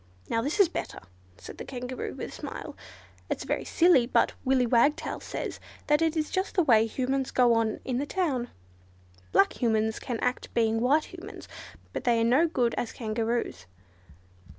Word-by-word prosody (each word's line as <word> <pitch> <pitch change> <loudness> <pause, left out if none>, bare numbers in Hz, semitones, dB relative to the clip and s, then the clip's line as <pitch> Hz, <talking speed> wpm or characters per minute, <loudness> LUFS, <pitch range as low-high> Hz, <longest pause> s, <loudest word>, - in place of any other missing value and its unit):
"Now 230 - +1
this 295 - -2
is 400 - +7
better!" 335 - -5 0.4
said 85 - -11
the - - -4
Kangaroo, 250 -1 -5
with - - -5
a - - -12
smile. - - -7 0.5
"It's - - -2
very - - -2
silly, 330 -9 +4
but - - +2
Willy 260 -1 +3
Wagtail 245 +5 +2
says - - -5 0.3
that 295 +1 +3
is 320 -1 0
just 375 +1 -1
the 360 - +4
way 225 -6 +5
Humans 265 +3 -1
go 245 -2 +4
on 225 -1 0
in 250 -1 -1
the 285 - -2
town. 285 -11 -1 0.8
Black 195 - +3
Humans 220 -2 +1
can 240 -3 -4
act 250 +1 -2
being 225 -1 +2
white 295 +8 +2
Humans, 370 +4 -10 0.5
but - - -4
they 235 -2 +3
are - - +2
no 260 +9 +4
good 245 -7 0
as 235 - -3
Kangaroos." 225 - -2
250 Hz, 175 wpm, -28 LUFS, 230-295 Hz, 0.8 s, is